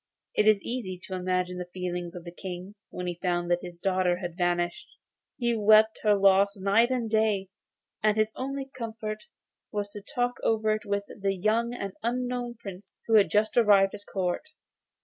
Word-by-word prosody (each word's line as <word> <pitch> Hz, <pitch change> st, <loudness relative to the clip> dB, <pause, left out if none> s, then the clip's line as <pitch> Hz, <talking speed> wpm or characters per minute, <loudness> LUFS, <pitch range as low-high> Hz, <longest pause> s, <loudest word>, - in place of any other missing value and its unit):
It 210 Hz, -, +2 dB
is 215 Hz, -2 st, +6 dB
easy 215 Hz, -7 st, -4 dB
to 190 Hz, -, -6 dB
imagine 180 Hz, 0 st, -1 dB
the 180 Hz, 0 st, -6 dB
feelings 180 Hz, -1 st, -4 dB
of 175 Hz, -, -7 dB
the 170 Hz, -, -8 dB
King 180 Hz, +2 st, -7 dB, 0.2 s
when 180 Hz, -, -5 dB
he 175 Hz, -1 st, -4 dB
found 175 Hz, -1 st, 0 dB
that 175 Hz, -, +2 dB
his 175 Hz, -1 st, -9 dB
daughter 185 Hz, -1 st, +1 dB
had 175 Hz, -2 st, -5 dB
vanished. 175 Hz, -1 st, 0 dB, 0.5 s
He 235 Hz, -2 st, +1 dB
wept 215 Hz, +1 st, +5 dB
her 210 Hz, -1 st, +4 dB
loss 200 Hz, +1 st, +4 dB
night 200 Hz, +5 st, +3 dB
and 250 Hz, -3 st, -1 dB
day, 215 Hz, -3 st, +1 dB, 0.5 s
and 215 Hz, 0 st, +3 dB
his 215 Hz, 0 st, +1 dB
only 275 Hz, +1 st, -3 dB
comfort 220 Hz, -4 st, -6 dB, 0.5 s
was 205 Hz, -1 st, -3 dB
to 205 Hz, -1 st, -8 dB
talk 245 Hz, +2 st, -2 dB
over 220 Hz, -1 st, +2 dB
it 215 Hz, 0 st, -4 dB
with 200 Hz, 0 st, -1 dB, 0.2 s
a 195 Hz, 0 st, +2 dB
young 220 Hz, +5 st, 0 dB
and 200 Hz, -5 st, -5 dB
unknown 245 Hz, 0 st, -2 dB
prince, 195 Hz, -3 st, -10 dB
who 225 Hz, -, -1 dB
had 210 Hz, -2 st, +6 dB
just 215 Hz, +1 st, +2 dB
arrived 205 Hz, -4 st, +5 dB
at 210 Hz, -, -8 dB
the -, -, -16 dB
Court. 185 Hz, -, -1 dB
205 Hz, 190 wpm, -28 LUFS, 180-220 Hz, 0.5 s, is